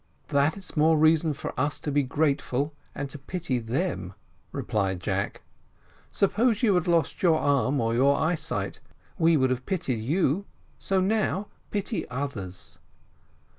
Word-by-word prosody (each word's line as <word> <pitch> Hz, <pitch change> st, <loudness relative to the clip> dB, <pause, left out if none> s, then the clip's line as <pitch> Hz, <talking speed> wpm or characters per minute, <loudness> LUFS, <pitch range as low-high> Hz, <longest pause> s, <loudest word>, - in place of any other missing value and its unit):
"That's 155 Hz, +6 st, 0 dB
more 160 Hz, +1 st, +4 dB
reason 155 Hz, +1 st, +4 dB
for 140 Hz, -, -6 dB
us 145 Hz, +2 st, 0 dB
to 145 Hz, -, -2 dB
be 145 Hz, +1 st, +3 dB
grateful 140 Hz, 0 st, 0 dB, 0.2 s
and 145 Hz, -, -3 dB
to 145 Hz, -, -8 dB
pity 160 Hz, -3 st, -2 dB
them," 115 Hz, -, -2 dB, 0.4 s
replied 95 Hz, -3 st, -1 dB
Jack; 95 Hz, +2 st, -2 dB, 0.7 s
"suppose 225 Hz, +4 st, +2 dB
you 215 Hz, -4 st, +5 dB
had 180 Hz, -2 st, +1 dB
lost 170 Hz, -2 st, +1 dB
your 165 Hz, -4 st, +4 dB
arm 140 Hz, -1 st, +2 dB
or 115 Hz, 0 st, +1 dB
your 140 Hz, +4 st, +4 dB
eyesight 160 Hz, +1 st, -1 dB, 0.4 s
we 165 Hz, 0 st, +5 dB
should 130 Hz, -2 st, +2 dB
have 130 Hz, 0 st, -3 dB
pitied 140 Hz, -, -1 dB
you; 165 Hz, -, +1 dB, 0.3 s
so 190 Hz, -1 st, +1 dB
now 205 Hz, 0 st, 0 dB, 0.2 s
pity 205 Hz, +2 st, -2 dB
others." 125 Hz, -9 st, -6 dB
145 Hz, 140 wpm, -27 LUFS, 130-175 Hz, 0.7 s, you